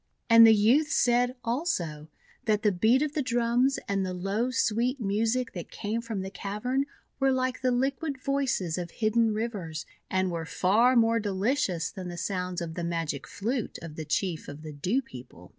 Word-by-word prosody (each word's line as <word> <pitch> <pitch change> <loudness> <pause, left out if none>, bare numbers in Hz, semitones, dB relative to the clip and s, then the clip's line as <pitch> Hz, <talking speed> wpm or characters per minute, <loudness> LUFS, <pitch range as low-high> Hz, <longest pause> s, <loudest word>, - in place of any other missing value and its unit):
And 230 0 +10
the 220 - +7
youths 260 +10 +3
said, 245 +1 +3
also, 230 - -2 0.4
that 210 0 +1
the 210 - +4
beat 220 +9 +3
of 300 -1 -2
drums 245 +2 +2
and 195 -1 0
the 185 -1 -3
low, 200 +7 -1
sweet 245 +2 +1
music 225 +4 0
that 175 -3 -7
came 220 +2 -3
from 225 -4 -4
the 190 0 -6
cavern 245 +8 -2 0.3
were 270 0 +3
like 255 0 -1
the 255 - +2
liquid 270 +4 -1
voices 260 - -1
of 175 -1 -4
hidden 225 +3 +1
rivers, 205 -8 -4 0.2
and 185 -1 +1
were 165 -1 -3
far 215 +10 +3
more 230 -1 +4
delicious 200 - 0
than 185 -3 -7
the 175 0 -6
sounds 180 -1 -2
of 165 -1 -4
the 175 - -4
magic 165 -6 -3
flute 230 +3 -3
of 165 -2 -7
the 160 - -5
Chief 160 +2 -2
of 145 +2 -9
the 155 -1 -7
Dew 190 - 0
People. 120 - -12
215 Hz, 180 wpm, -28 LUFS, 180-245 Hz, 0.4 s, And